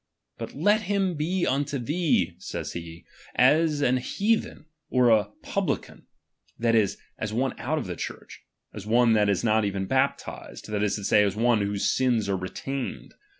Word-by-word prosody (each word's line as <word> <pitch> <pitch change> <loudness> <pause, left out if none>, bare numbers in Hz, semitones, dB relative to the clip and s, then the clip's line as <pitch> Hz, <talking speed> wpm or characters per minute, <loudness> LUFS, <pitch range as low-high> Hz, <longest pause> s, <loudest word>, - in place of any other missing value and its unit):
But - - -6
let 205 +9 +3
him 195 -3 +1
he 175 +4 0
unto 140 +1 0
thee, 135 - +1
says - - -5
he, 85 0 -8 0.3
as 150 +3 +4
an 130 -2 +3
heathen, 205 - -1 0.2
or 115 -5 +3
jmh - - -1
lican; - - -4 0.5
that 115 0 +1
is, 110 -4 +2 0.2
as 110 - -3
one 130 +2 0
out 155 +5 -1
of 150 - -2
the 90 -2 -5
Church, - - -8 0.3
as 105 -1 -8
one 120 +1 +4
that 105 -2 +3
is 100 +1 +1
not 110 -1 +3 0.2
baptized, - - -2
that 105 -1 -1
is 105 -1 +1
to 105 - -6
say, 105 +1 +4
as 100 -1 0
one 115 0 +3
whose 100 0 0
sins 120 -5 +1
are 100 - +1
retained. 130 +8 -5
120 Hz, 170 wpm, -26 LUFS, 105-145 Hz, 0.5 s, as